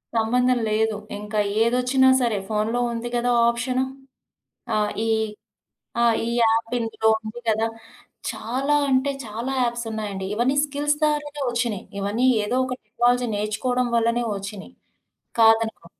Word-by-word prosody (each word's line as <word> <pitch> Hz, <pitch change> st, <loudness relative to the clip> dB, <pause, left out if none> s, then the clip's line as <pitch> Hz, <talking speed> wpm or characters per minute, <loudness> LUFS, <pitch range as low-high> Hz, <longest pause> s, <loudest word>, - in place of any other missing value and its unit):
సంబంధం 250 Hz, +3 st, +2 dB
లేదు. 220 Hz, 0 st, +1 dB, 0.2 s
ఇంకా 210 Hz, +1 st, -3 dB, 0.2 s
ఏదొచ్చినా 250 Hz, +3 st, +3 dB
సరే 235 Hz, -4 st, +1 dB
ఫోనులో 220 Hz, +2 st, 0 dB
ఉంది 235 Hz, +1 st, -4 dB
గదా! 240 Hz, +1 st, +1 dB, 0.2 s
ఆప్షను. 250 Hz, +2 st, 0 dB, 0.9 s
ఆ -, -, +2 dB, 0.3 s
ఈ -, -, 0 dB, 0.9 s
ఆ -, -, +4 dB, 0.2 s
ఈ -, -, -3 dB
యాప్ 225 Hz, 0 st, +2 dB
ఇందులో 225 Hz, -1 st, -1 dB
ఉంది 220 Hz, +2 st, -8 dB
గదా! 220 Hz, +1 st, +2 dB, 0.6 s
చాలా 270 Hz, +6 st, -1 dB
అంటే 265 Hz, +1 st, +2 dB
చాలా 230 Hz, +4 st, -4 dB
యాప్స్ 240 Hz, -1 st, -1 dB
ఉన్నాయండి. 205 Hz, -3 st, -4 dB
ఇవన్నీ 245 Hz, +5 st, +1 dB
స్కిల్స్ 290 Hz, +1 st, 0 dB
ద్వారానే 295 Hz, -1 st, 0 dB
ఒచ్చినయి. 235 Hz, -4 st, -1 dB, 0.2 s
ఇవన్నీ 205 Hz, +5 st, 0 dB, 0.2 s
ఏదో 210 Hz, +4 st, -1 dB
ఒక 255 Hz, -, -3 dB
టెక్నాలజీ 245 Hz, +3 st, +1 dB
నేర్చుకోవడం 245 Hz, +4 st, -1 dB
వల్లనే 235 Hz, +1 st, +2 dB
ఒచ్చినియి. 195 Hz, +3 st, -7 dB, 0.7 s
కాదనుకో 225 Hz, -4 st, +3 dB
235 Hz, 130 wpm, -23 LUFS, 220-250 Hz, 0.9 s, ఆ